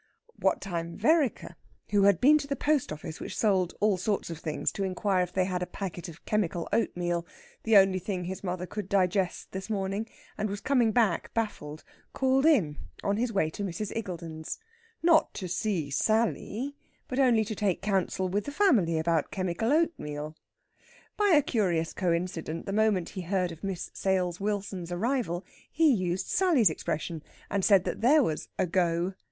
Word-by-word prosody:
What 190 Hz, -, +1 dB
time 170 Hz, -3 st, -4 dB
Vereker, 290 Hz, +4 st, +2 dB, 0.4 s
who 200 Hz, -1 st, +4 dB
had 200 Hz, -4 st, +5 dB
been 300 Hz, +6 st, +6 dB
to 280 Hz, -, -6 dB
the 280 Hz, -, -1 dB
post 290 Hz, -, +1 dB
office, 155 Hz, +1 st, -7 dB
which -, -, -6 dB
sold 190 Hz, -5 st, +2 dB
all 210 Hz, -2 st, +3 dB
sorts 195 Hz, -1 st, -1 dB
of 165 Hz, -, -6 dB
things, 155 Hz, -2 st, -2 dB
to 200 Hz, -, -3 dB
inquire 190 Hz, 0 st, 0 dB
if 180 Hz, -1 st, -2 dB
they 185 Hz, 0 st, +1 dB
had 180 Hz, -1 st, -2 dB
a 180 Hz, -, -2 dB
packet 180 Hz, -2 st, -6 dB
of 170 Hz, 0 st, -13 dB
chemical 180 Hz, -5 st, -1 dB
oatmeal 175 Hz, -6 st, 0 dB, 0.4 s
(the 220 Hz, -2 st, +5 dB
only 190 Hz, -1 st, +5 dB
thing 185 Hz, 0 st, -3 dB
his 185 Hz, +3 st, -6 dB
mother 180 Hz, -1 st, -3 dB
could 200 Hz, +1 st, -6 dB
digest 190 Hz, -1 st, 0 dB
this 190 Hz, +3 st, -6 dB
morning), 200 Hz, +1 st, -2 dB, 0.3 s
and 215 Hz, -, 0 dB
was 200 Hz, +1 st, -4 dB
coming 245 Hz, -1 st, +2 dB
back 220 Hz, -6 st, +1 dB
baffled, 155 Hz, -9 st, -3 dB, 0.3 s
called 270 Hz, +2 st, +3 dB
in 180 Hz, -, +3 dB, 0.2 s
on 200 Hz, 0 st, +1 dB
his 235 Hz, +1 st, 0 dB
way 175 Hz, -7 st, +1 dB
to 205 Hz, -, -5 dB
Mrs. 195 Hz, +2 st, -4 dB
Iggulden's. 170 Hz, -7 st, -5 dB, 0.5 s
Not 330 Hz, -2 st, +4 dB
to 185 Hz, -, -4 dB
see 175 Hz, -5 st, -1 dB
Sally, 225 Hz, -, 0 dB, 0.3 s
but 255 Hz, -, -3 dB
only 240 Hz, -5 st, +4 dB
to 215 Hz, -, -4 dB
take 200 Hz, -3 st, -1 dB
counsel 190 Hz, -2 st, 0 dB
with 200 Hz, +3 st, -1 dB
the 285 Hz, -, -4 dB
family 235 Hz, -, +3 dB
about 160 Hz, -1 st, +1 dB
chemical 185 Hz, +5 st, -1 dB
oatmeal. 155 Hz, -, -1 dB, 0.8 s
By 415 Hz, -, +2 dB
a 310 Hz, -7 st, +5 dB
curious 185 Hz, -, 0 dB
coincident, 170 Hz, -2 st, -2 dB
the 195 Hz, -, -3 dB
moment 210 Hz, -5 st, +2 dB
he 190 Hz, -, -6 dB
heard 180 Hz, 0 st, -1 dB
of 165 Hz, +2 st, -11 dB
Miss 190 Hz, -3 st, -4 dB
Sales 180 Hz, -2 st, 0 dB
Wilson's 195 Hz, -3 st, -3 dB
arrival, 190 Hz, -2 st, -1 dB, 0.3 s
he 315 Hz, -3 st, +4 dB
used 185 Hz, -3 st, -1 dB
Sally's 310 Hz, -, +3 dB
expression, 155 Hz, +1 st, -3 dB, 0.3 s
and 200 Hz, -1 st, 0 dB
said 195 Hz, -3 st, +5 dB
that -, -, -4 dB
there 285 Hz, +5 st, +5 dB
was 155 Hz, -9 st, -2 dB
"a -, -, +2 dB
go!" 175 Hz, +1 st, +1 dB
195 Hz, 180 wpm, -28 LUFS, 175-220 Hz, 0.8 s, been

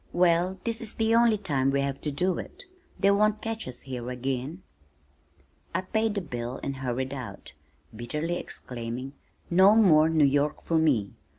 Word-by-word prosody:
"Well, 175 Hz, +1 st, +2 dB
this 230 Hz, -1 st, -2 dB
is 225 Hz, -, -4 dB
the 225 Hz, 0 st, +1 dB
only 230 Hz, -1 st, +5 dB
time 140 Hz, -9 st, 0 dB
we 140 Hz, 0 st, +1 dB
have 140 Hz, 0 st, -3 dB
to 150 Hz, -, -2 dB
do 180 Hz, +5 st, 0 dB
it. 395 Hz, +2 st, -9 dB, 0.3 s
They 200 Hz, +1 st, +4 dB
won't 210 Hz, +1 st, +2 dB
catch 225 Hz, -5 st, -4 dB
us 125 Hz, -, -7 dB
here 125 Hz, -2 st, -6 dB
again." 130 Hz, +6 st, -4 dB, 1.1 s
I -, -, +1 dB
paid 220 Hz, +3 st, -1 dB
the 200 Hz, -, -1 dB
bill 125 Hz, -5 st, -5 dB
and 135 Hz, -1 st, -3 dB
hurried 130 Hz, +1 st, -3 dB
out, 130 Hz, -, -8 dB, 0.4 s
bitterly 150 Hz, +9 st, -3 dB
exclaiming, 125 Hz, 0 st, -6 dB, 0.4 s
"No 190 Hz, +4 st, +6 dB
more 160 Hz, -8 st, +6 dB
New 160 Hz, -2 st, +4 dB
York 145 Hz, +2 st, +1 dB
for 165 Hz, -1 st, +1 dB
me. 130 Hz, -11 st, +1 dB
155 Hz, 170 wpm, -27 LUFS, 130-195 Hz, 1.1 s, No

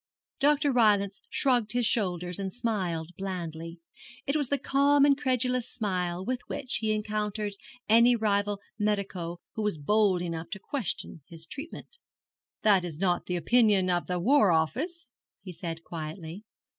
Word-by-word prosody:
Dr. 290 Hz, +1 st, +3 dB
Rylance 205 Hz, -5 st, +3 dB
shrugged 245 Hz, -5 st, +1 dB
his 245 Hz, -1 st, +1 dB
shoulders 180 Hz, -5 st, 0 dB
and 195 Hz, -1 st, -3 dB
smiled 185 Hz, -9 st, -2 dB
blandly. 165 Hz, -3 st, -5 dB, 0.4 s
It 275 Hz, -, 0 dB
was 290 Hz, -4 st, +1 dB
the 285 Hz, -, +2 dB
calm, 280 Hz, +1 st, +3 dB
incredulous 255 Hz, -3 st, +1 dB
smile 185 Hz, -5 st, -2 dB
with 255 Hz, +1 st, -2 dB
which 260 Hz, -2 st, -1 dB
he 220 Hz, -1 st, 0 dB
encountered 210 Hz, -1 st, -2 dB, 0.3 s
any 235 Hz, +3 st, +6 dB
rival 205 Hz, -2 st, 0 dB, 0.2 s
medico 195 Hz, -5 st, -2 dB
who 220 Hz, -, -4 dB
was 210 Hz, -6 st, 0 dB
bold 190 Hz, +3 st, +2 dB
enough 165 Hz, -1 st, -4 dB
to 195 Hz, -, -6 dB
question 210 Hz, -, -4 dB
his 165 Hz, -1 st, -10 dB
treatment. 325 Hz, -, -9 dB, 0.6 s
'That 200 Hz, -4 st, +5 dB
is 165 Hz, -3 st, -6 dB
not 180 Hz, -2 st, +1 dB
the 180 Hz, -, -1 dB
opinion 205 Hz, -1 st, +3 dB
of 175 Hz, -1 st, 0 dB
the 180 Hz, -, -1 dB
War 225 Hz, 0 st, +4 dB
Office,' 255 Hz, -, -1 dB, 0.4 s
he 190 Hz, -, -7 dB
said 165 Hz, -1 st, -6 dB
quietly. 165 Hz, +4 st, -7 dB
205 Hz, 145 wpm, -28 LUFS, 175-245 Hz, 0.6 s, any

